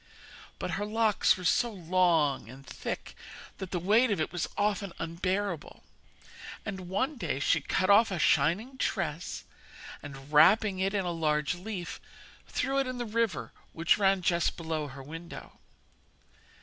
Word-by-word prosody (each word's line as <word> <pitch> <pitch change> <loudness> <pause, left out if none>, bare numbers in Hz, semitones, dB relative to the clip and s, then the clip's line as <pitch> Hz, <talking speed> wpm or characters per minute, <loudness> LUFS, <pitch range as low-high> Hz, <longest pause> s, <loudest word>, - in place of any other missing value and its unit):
But - - -4
her 205 - -2
locks 215 -2 +3
were 185 - -8
so 235 +7 +3
long 170 - +1
and 135 +2 -12
thick - - -6 0.5
that 190 - -5
the 180 - -2
weight 215 +8 +3
of 205 - 0
it 155 - -1
was 180 -2 -2
often 200 -3 0
unbearable, 180 +1 -3 0.8
and 190 -4 -6
one 260 +10 -1
day 165 - -2
she 155 +2 +2
cut 185 +6 0
off 220 +3 +6
a 190 - -2
shining 175 - +2
tress, 175 -7 -2 0.6
and 140 0 -10
wrapping 195 +5 +5
it 195 +2 0
in 195 -2 0
a 175 - -1
large 150 -2 0
leaf, 180 0 -6 0.5
threw 270 +2 0
it 270 - 0
in 255 0 -4
the 240 - -3
river 225 -5 -1 0.2
which 165 +4 +2
ran 195 -2 +3
just 170 0 +1
below 160 -3 -3
her 135 0 -10
window. 165 +4 -9
185 Hz, 155 wpm, -29 LUFS, 165-210 Hz, 0.8 s, off